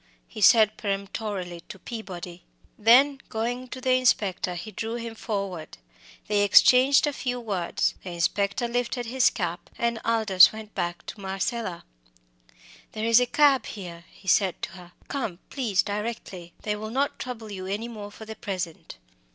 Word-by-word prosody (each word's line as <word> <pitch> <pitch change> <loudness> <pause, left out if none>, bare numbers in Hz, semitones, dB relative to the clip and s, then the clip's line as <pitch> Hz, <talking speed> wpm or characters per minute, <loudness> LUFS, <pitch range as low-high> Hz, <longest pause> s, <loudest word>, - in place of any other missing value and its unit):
he 215 - -9
said 215 0 +6
peremptorily 195 -3 -4
to - - -8
Peabody; 180 -4 -8 0.3
then 260 +6 +5
going 240 +2 -2
up - - -18
to 260 - -7
the 255 0 0
inspector 205 -8 +1
he 195 +6 -7
drew 225 +3 -4
him 230 -1 -5
forward. 195 -7 -4 0.5
They 210 -1 +1
exchanged 255 +7 +6
a 295 - -1
few 250 -2 -3
words, 195 -7 -1
the 185 - -6
inspector 200 +7 0
lifted 245 +1 -2
his 245 +2 +3
cap, 175 -3 -4
and 235 -1 -1
Aldous 220 -5 +6
went 215 -1 -10
back 175 0 -3
to 205 - -8
Marcella. 195 0 -3 1.1
"There 220 0 -3
is 230 +1 +6
a 250 - +1
cab 285 -1 +4
here," 170 -4 -8
he 190 - -19
said 190 -1 +3
to - - -3
her. 180 -1 -13
"Come, 225 -11 -3
please, 220 -9 +1
directly. 205 -5 -5
They 210 -1 -1
will 215 +1 -6
not 275 +5 -1
trouble 225 -4 -6
you 185 -2 -6
any 205 +4 -3
more 210 -3 -8
for 220 +2 -11
the 220 0 -8
present." 180 -6 -5
215 Hz, 165 wpm, -26 LUFS, 190-235 Hz, 1.1 s, said